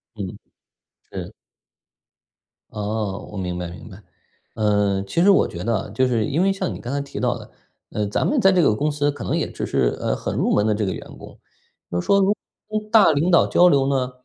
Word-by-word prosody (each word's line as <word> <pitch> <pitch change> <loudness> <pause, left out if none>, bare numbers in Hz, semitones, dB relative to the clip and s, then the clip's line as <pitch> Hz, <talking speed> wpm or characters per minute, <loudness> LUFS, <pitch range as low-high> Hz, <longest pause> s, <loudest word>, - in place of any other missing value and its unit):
嗯， 100 -4 -6 0.7
是。 - - -6 1.4
哦， 105 -2 -4
我 105 - -7
明 90 -2 -3
白 90 -1 -4
明 85 +5 -11
白。 100 +1 -13 0.5
呃， 105 -2 +1
其 100 +12 -1
实 195 - +5
我 195 - +5
觉 85 0 -7
得 115 -3 -1
就 130 0 +1
是 115 -4 +1
因 150 +9 0
为 195 - +3
像 195 -2 -3
你 - - -8
刚 120 - -5
才 140 - -1
提 140 - -7
到 - - 0
的， - - -13 0.4
呃， 105 -1 -1
咱 100 - 0
们 285 -4 +1
在 195 - +6
这 185 -2 +3
个 110 - +4
公 150 +7 0
司 145 0 0
可 145 - -8
能 - - -1
也 - - -1
只 - - -5
是， - - 0
呃， - - -1
很 - - -4
入 - - +1
门 105 - +2
的 110 - +2
这 105 -1 -1
个 95 - -1
员 - - -8
工。 - - -13 0.5
就 90 - -1
是 - - -11
说 200 - +4
如 195 - +4
果 205 - +4 0.4
跟 215 0 -4
大 215 -7 +7
领 155 +5 +1
导 170 - +5
交 180 0 +5
流 140 -4 +3
呢， 130 -2 0
125 Hz, 250 characters per minute, -22 LUFS, 105-170 Hz, 1.4 s, 大